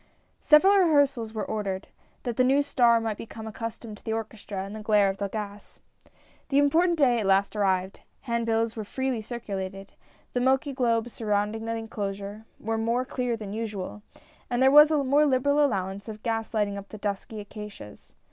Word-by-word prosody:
Several 385 +6 +6
rehearsals 285 - +3
were 220 -1 -3
ordered, 200 -3 -3 0.4
that 240 -3 -3
the 255 - +3
new 275 +3 +4
star 240 -5 +4
might 225 -2 -3
become 220 0 -8
accustomed 225 -1 -7
to - - -27
the 220 - -2
orchestra 210 -3 -5
and 200 +2 -7
the 215 - -6
glare 210 -2 +3
of 195 - -10
the 200 - -2
gas. 205 -1 -7 0.7
The 275 - +2
important 330 +5 +3
day 250 -5 +4
at 205 - -1
last 195 +2 +2
arrived. 190 -2 0 0.2
Hand 235 -1 -2
bills 225 0 +1
were 220 - -4
freely 260 +2 -2
circulated. 195 -4 -6 0.4
The 245 - +1
milky 265 +3 +2
globes 235 -2 0
surrounding 210 0 -1
the 230 0 -2
enclosure, 205 -1 -5
were 225 +1 -2
more 235 +3 0
clear 250 -3 -2
than 205 -2 -7
usual, 210 -2 -5 0.5
and 245 -1 0
there 265 +1 +5
was 300 +1 +9
a 300 -3 +2
more 285 +3 +4
liberal 285 +2 +3
allowance 200 -4 -2
of 215 0 -9
gas 225 -1 -2
lighting 205 -3 0
up 200 - -12
the 215 - -8
dusky 205 +1 -4
acacias. 205 - -10
225 Hz, 185 wpm, -27 LUFS, 205-255 Hz, 0.7 s, was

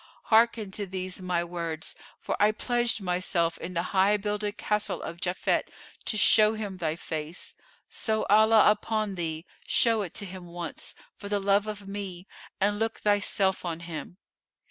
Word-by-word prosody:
hearken 225 -2 +4
to 205 +1 -4
these 185 0 -4
my 180 -2 0
words 170 -2 -4 0.2
for - - -3
I 210 +1 +5
pledged 240 0 0
myself 180 -2 0
in 180 +1 -6
the 170 - +1
High 195 +2 +4
builded 210 +1 -2
Castle 210 0 -1
of 170 +1 -7
Japhet, 180 0 0 0.4
to 215 - 0
show 215 +1 +6
him 205 -3 -5
thy 160 -3 -1
face. 160 0 -4 0.3
So 220 -1 -1
Allah 215 +1 +6
upon 215 -1 -1
thee, 165 -2 -3 0.2
show 230 -2 +3
it 180 -4 -6
to 205 - -4
him 185 -1 -9
once, 170 -1 -6 0.2
for 200 - -9
the 205 0 +1
love 200 +1 +2
of 205 -2 -6
me, 195 -3 -6 0.3
and 205 +1 +2
look 225 0 -1
thyself 200 -2 +2
on 170 -2 -4
him!" 170 0 -7
195 Hz, 165 wpm, -28 LUFS, 175-210 Hz, 0.4 s, show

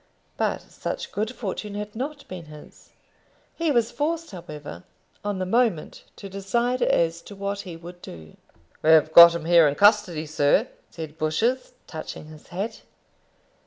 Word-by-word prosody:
But - - -1
such - - -6
good 215 +2 -2
fortune 210 -3 -5
had 210 +1 -6
not 280 +4 -5
been 180 -3 -8
his. 150 -1 -14 0.6
He 330 -1 -1
was 235 -4 +2
forced, 330 +3 -2
however, 150 - -9 0.4
on 205 -1 -2
the 185 - -2
moment 220 -5 0
to 200 - -9
decide 235 +6 -1
as 170 -4 +2
to 205 - -12
what 200 +1 -3
he 180 -4 -7
would 175 +1 -12
do. 80 -2 -11 0.5
"We've 160 0 +5
got 170 0 +10
him 165 -2 -5
here 170 -2 +6
in 145 - 0
custody, 205 -5 +3
sir," 155 - +2 0.2
said 160 -2 -9
Bushers, 225 +12 0
touching 160 -1 -8
his 155 -1 -14
hat. 195 +5 -5
185 Hz, 155 wpm, -24 LUFS, 160-220 Hz, 0.6 s, got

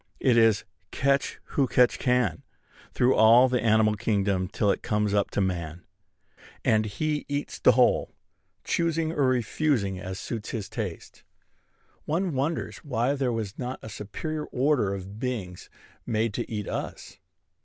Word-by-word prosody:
It 125 -3 +3
is 115 -2 +4 0.2
"catch 140 +5 0
who 140 -2 +2
catch 125 0 +3
can" 125 - +1 0.5
through 125 +1 +3
all 115 +4 +7
the 125 -2 0
animal 110 -1 +3
kingdom 100 -4 0
till 100 +1 +1
it - - -2
comes 105 -1 0
up 100 -1 +2
to - - -1
man; 85 -3 -3 0.8
and 110 0 +3
he 150 +8 -2
eats 145 0 -3
the - - +6
whole, - - +3 0.5
choosing 165 -1 0
or 145 -5 +1
refusing 120 -5 0
as 95 0 -6
suits 110 0 -5
his 105 -4 -4
taste. 105 -8 -6 0.8
One 170 +2 -1
wonders 140 +5 -2
why 125 -1 -1
there 135 -3 0
was 110 -4 -4
not 125 +1 -4
a 110 - -7
superior 150 +10 -5
order 130 -6 +1
of 100 +2 -8
beings 110 -9 -4 0.4
made 110 -2 0
to - - -4
eat 105 -3 -3
us. - - -6
115 Hz, 150 wpm, -26 LUFS, 100-135 Hz, 0.8 s, all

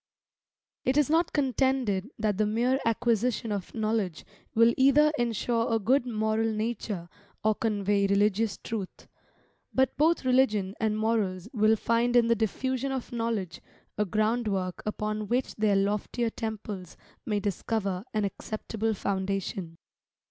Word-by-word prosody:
It 260 +2 +1
is 295 0 +3
not 330 +1 +3
contended 260 -7 +1
that 210 -3 0
the 215 - +3
mere 240 +5 +1
acquisition 230 0 +1
of 200 -3 -4
knowledge 215 -7 -1 0.3
will 230 +1 +6
either 280 +3 +5
ensure 230 0 0
a 225 - +3
good 245 +5 +2
moral 220 0 0
nature, 215 -5 -3 0.4
or 215 0 +4
convey 205 -2 +1
religious 205 +2 +2
truth. 210 -5 -6 0.6
But 265 0 +2
both 315 -1 +3
religion 215 -7 +2
and 215 -1 0
morals 215 -4 0
will 215 -1 +4
find 235 +2 +1
in 240 -1 +6
the 230 - +5
diffusion 260 +5 -1
of 260 -2 -4
knowledge 230 -7 -2 0.3
a 210 - +1
ground 215 +4 0
work 185 -3 -2
upon 215 0 -2
which 250 +4 0
their 210 -2 +3
loftier 210 +4 0
temples 210 -5 -6 0.3
may 210 -2 -1
discover 200 -1 -2
an 215 -1 0
acceptable 220 +2 -3
foundation. 190 -3 -3
220 Hz, 135 wpm, -28 LUFS, 205-240 Hz, 0.6 s, will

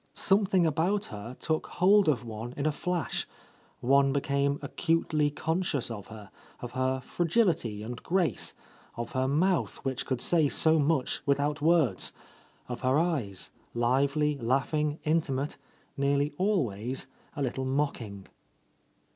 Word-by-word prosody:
Something 195 -2 +3
about 175 +7 +1
her 110 +4 -7
took 155 0 -1
hold 195 0 +4
of 125 -5 0
one 115 +2 -6
in 140 - -2
a 155 - +3
flash; 175 +1 -2 0.5
one 135 +2 +4
became 140 0 +1
acutely 155 0 +1
conscious 155 -4 -1
of 105 -4 -7
her, 110 -2 -11 0.3
of 120 - -6
her 130 0 0
fragility 165 - 0
and 120 +2 -6
grace, 175 - 0 0.4
of 120 0 -4
her 130 0 0
mouth 175 +6 +1
which 130 -2 -2
could 130 -3 -1
say 160 +1 +3
so 160 +2 +3
much 145 -2 +1
without 145 +1 +1
words; 155 - +2 0.5
of 125 -1 -5
her 130 +2 +3
eyes, 140 - -1 0.2
lively, 140 +5 +2
laughing, 145 +5 0
intimate, 150 -3 0 0.4
nearly 140 +1 +1
always 130 - -1 0.3
a 145 - -2
little 130 +1 -2
mocking. 120 -8 -2
140 Hz, 130 wpm, -29 LUFS, 125-160 Hz, 0.5 s, hold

